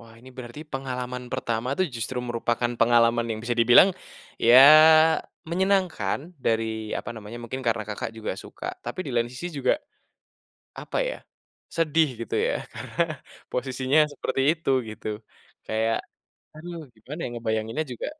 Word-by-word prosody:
Wah 115 Hz, -1 st, -15 dB
ini 130 Hz, +2 st, -14 dB
berarti 125 Hz, +3 st, -8 dB
pengalaman 125 Hz, -1 st, -4 dB
pertama 115 Hz, +1 st, -2 dB
tuh 185 Hz, -, +3 dB
justru 120 Hz, +3 st, -3 dB
merupakan 120 Hz, 0 st, -1 dB
pengalaman 115 Hz, 0 st, +4 dB
yang 110 Hz, -, -2 dB
bisa 120 Hz, 0 st, 0 dB
dibilang, 125 Hz, +11 st, +8 dB, 0.5 s
ya 120 Hz, +2 st, +7 dB, 0.9 s
menyenangkan 180 Hz, -, 0 dB
dari 110 Hz, -2 st, -1 dB
apa 120 Hz, -, -6 dB
namanya, 110 Hz, +1 st, -9 dB
mungkin 130 Hz, +3 st, -5 dB
karena 115 Hz, -2 st, +1 dB
Kakak 105 Hz, +1 st, -4 dB
juga 110 Hz, -, -3 dB
suka 330 Hz, -, -9 dB, 0.2 s
tapi 185 Hz, -, -4 dB
di -, -, -4 dB
lain 120 Hz, 0 st, +1 dB
sisi 130 Hz, +8 st, -6 dB
juga, 130 Hz, -, +2 dB, 1.1 s
apa -, -, -5 dB
ya? -, -, -5 dB, 0.6 s
Sedih 160 Hz, -2 st, +2 dB
gitu -, -, -9 dB
ya -, -, 0 dB, 0.2 s
karena 170 Hz, -, -4 dB, 0.5 s
posisinya 130 Hz, +3 st, +1 dB
seperti 135 Hz, -, -2 dB, 0.2 s
itu 160 Hz, -, -4 dB, 0.2 s
gitu. 110 Hz, -, -8 dB, 0.6 s
Kayak, 110 Hz, +1 st, +1 dB, 0.6 s
aduh 170 Hz, +2 st, -8 dB, 0.2 s
gimana 135 Hz, +9 st, -9 dB
ya -, -, -2 dB
ngebayanginnya 115 Hz, +4 st, -2 dB
juga. 120 Hz, -, -5 dB
120 Hz, 140 wpm, -25 LUFS, 115-140 Hz, 1.1 s, dibilang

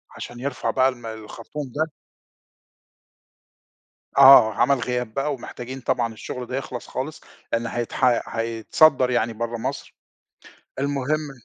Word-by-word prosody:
عشان 120 Hz, -, -8 dB
يرْفع 135 Hz, 0 st, -3 dB
بقى 130 Hz, 0 st, +3 dB
الم 120 Hz, -3 st, -9 dB
الخرطوم 115 Hz, +5 st, -7 dB
ده. 155 Hz, +1 st, 0 dB, 2.3 s
آه 135 Hz, -5 st, +9 dB
عمل 140 Hz, +6 st, +3 dB
غياب 125 Hz, -2 st, -2 dB
بقى، 140 Hz, +3 st, -1 dB
ومحتاجين 130 Hz, 0 st, -8 dB
طبعًا 115 Hz, -2 st, 0 dB
الشغل 125 Hz, +3 st, -6 dB
ده 130 Hz, -, -3 dB
يخْلص 130 Hz, -2 st, -6 dB
خالص؛ 150 Hz, +4 st, -5 dB, 0.3 s
لأن 115 Hz, 0 st, 0 dB
هيتح 120 Hz, +1 st, +1 dB
هيتصدر 115 Hz, +5 st, +3 dB
يعني 115 Hz, -2 st, +1 dB
برا 115 Hz, +1 st, -3 dB
مصر، 115 Hz, -, -5 dB, 0.8 s
المهم 140 Hz, +2 st, -1 dB
125 Hz, 120 wpm, -23 LUFS, 115-140 Hz, 2.3 s, آه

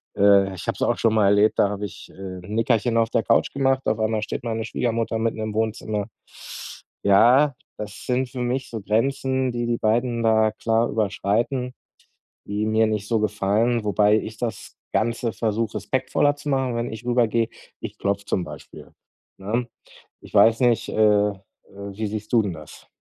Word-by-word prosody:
Äh, 100 Hz, -1 st, +4 dB
ich 90 Hz, -, -8 dB
habe -, -, 0 dB
es -, -, -12 dB
auch -, -, +1 dB
schon 110 Hz, -1 st, +2 dB
mal 105 Hz, -, +4 dB
erlebt, 100 Hz, +2 st, +4 dB
da 100 Hz, -, +4 dB
habe 105 Hz, 0 st, -4 dB
ich, 95 Hz, -, -10 dB
äh, -, -, -19 dB
'n 95 Hz, +1 st, -8 dB
Nickerchen 115 Hz, +1 st, +1 dB
auf 115 Hz, -1 st, +2 dB
der 115 Hz, -, +1 dB
Couch 115 Hz, -, +2 dB
gemacht. 135 Hz, -1 st, +1 dB
Auf 110 Hz, -, +1 dB
einmal 110 Hz, 0 st, 0 dB
steht 110 Hz, -, -4 dB
meine 115 Hz, -1 st, -2 dB
Schwiegermutter 115 Hz, -1 st, -1 dB
mitten 110 Hz, 0 st, -1 dB
im 110 Hz, -1 st, -4 dB
Wohnzimmer. 110 Hz, -2 st, -1 dB, 1.0 s
Ja, 125 Hz, +8 st, +5 dB, 0.2 s
das 105 Hz, 0 st, -8 dB
sind 125 Hz, 0 st, 0 dB
für 130 Hz, -, -7 dB
mich 125 Hz, +2 st, -2 dB
so 115 Hz, -, -5 dB
Grenzen, 130 Hz, +5 st, 0 dB
die 120 Hz, 0 st, -2 dB
die 120 Hz, -1 st, 0 dB
beiden 115 Hz, +2 st, 0 dB
da 110 Hz, -1 st, +3 dB
klar 115 Hz, +1 st, +1 dB
überschreiten, 110 Hz, +5 st, -1 dB, 0.7 s
die 105 Hz, +1 st, -2 dB
mir 110 Hz, +1 st, +3 dB
nicht 105 Hz, -1 st, -2 dB
so 115 Hz, -2 st, +1 dB
gefallen, 105 Hz, +3 st, +1 dB
wobei 105 Hz, 0 st, +3 dB
ich 110 Hz, 0 st, -7 dB
das 120 Hz, -2 st, -5 dB, 0.2 s
ganze 115 Hz, 0 st, 0 dB
versuche 110 Hz, 0 st, -2 dB
respektvoller 140 Hz, +2 st, 0 dB
zu 145 Hz, -, -9 dB
machen. 130 Hz, -3 st, 0 dB
Wenn 115 Hz, +1 st, -2 dB
ich 110 Hz, -, -8 dB
rüber 120 Hz, -2 st, +3 dB
gehe, 115 Hz, 0 st, 0 dB, 0.3 s
ich -, -, -7 dB
klopfe 100 Hz, 0 st, -1 dB
zum 90 Hz, -, -1 dB
Beispiel, -, -, -11 dB, 0.5 s
ne? 115 Hz, +5 st, -2 dB, 0.5 s
Ich -, -, -15 dB
weiß 115 Hz, +1 st, +5 dB
nicht, 120 Hz, -2 st, +2 dB
äh, -, -, -5 dB, 0.3 s
äh, -, -, -8 dB, 0.4 s
wie 100 Hz, +2 st, -6 dB
siehst 105 Hz, 0 st, -6 dB
du 115 Hz, -, +6 dB
denn 95 Hz, -, -3 dB
das? 75 Hz, -2 st, -12 dB
110 Hz, 185 wpm, -23 LUFS, 105-120 Hz, 1.0 s, du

